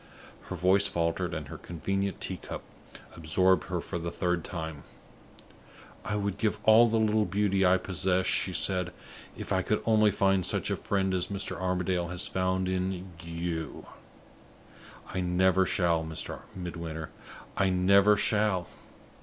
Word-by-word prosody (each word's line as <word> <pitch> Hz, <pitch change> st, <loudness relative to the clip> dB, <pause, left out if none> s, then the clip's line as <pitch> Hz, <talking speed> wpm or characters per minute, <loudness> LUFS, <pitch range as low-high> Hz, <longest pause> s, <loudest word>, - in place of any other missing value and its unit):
Her -, -, -5 dB
voice 95 Hz, +2 st, +4 dB
faltered, 85 Hz, +1 st, -1 dB
and 75 Hz, -2 st, -5 dB
her -, -, -8 dB
convenient 95 Hz, +3 st, -3 dB
tea -, -, -3 dB
cup -, -, -7 dB, 0.5 s
absorbed 90 Hz, +3 st, +2 dB
her 90 Hz, -1 st, -2 dB
for 85 Hz, -, -4 dB
the 85 Hz, +1 st, -3 dB
third 90 Hz, -1 st, -1 dB
time. 80 Hz, -4 st, -6 dB, 1.2 s
"I 105 Hz, -, -2 dB
would 100 Hz, -1 st, -2 dB
give 110 Hz, -2 st, 0 dB
all 115 Hz, +2 st, +7 dB
the 115 Hz, -, +1 dB
little 110 Hz, -1 st, +2 dB
beauty 100 Hz, -1 st, +1 dB
I 95 Hz, 0 st, +5 dB
possess," 95 Hz, 0 st, 0 dB
she 95 Hz, -, +1 dB
said, 90 Hz, 0 st, 0 dB, 0.4 s
"if -, -, -4 dB
I -, -, +2 dB
could -, -, 0 dB
only 110 Hz, -1 st, +4 dB
find 95 Hz, -1 st, +2 dB
such -, -, -1 dB
a -, -, +1 dB
friend 95 Hz, -2 st, -1 dB
as 90 Hz, -1 st, 0 dB
Mr. 100 Hz, -1 st, -2 dB
Armadale 90 Hz, -1 st, -1 dB
has 90 Hz, +1 st, -4 dB
found 95 Hz, 0 st, 0 dB
in 95 Hz, 0 st, -2 dB
you. 85 Hz, -2 st, -4 dB, 1.3 s
I 95 Hz, -, -1 dB
never 95 Hz, +1 st, +3 dB
shall, 85 Hz, -4 st, +1 dB
Mr. 80 Hz, 0 st, -5 dB, 0.2 s
Midwinter 85 Hz, -3 st, -6 dB, 0.4 s
I 95 Hz, -1 st, +2 dB
never 100 Hz, +3 st, +5 dB
shall. 105 Hz, -4 st, +1 dB
95 Hz, 150 wpm, -29 LUFS, 85-100 Hz, 1.3 s, all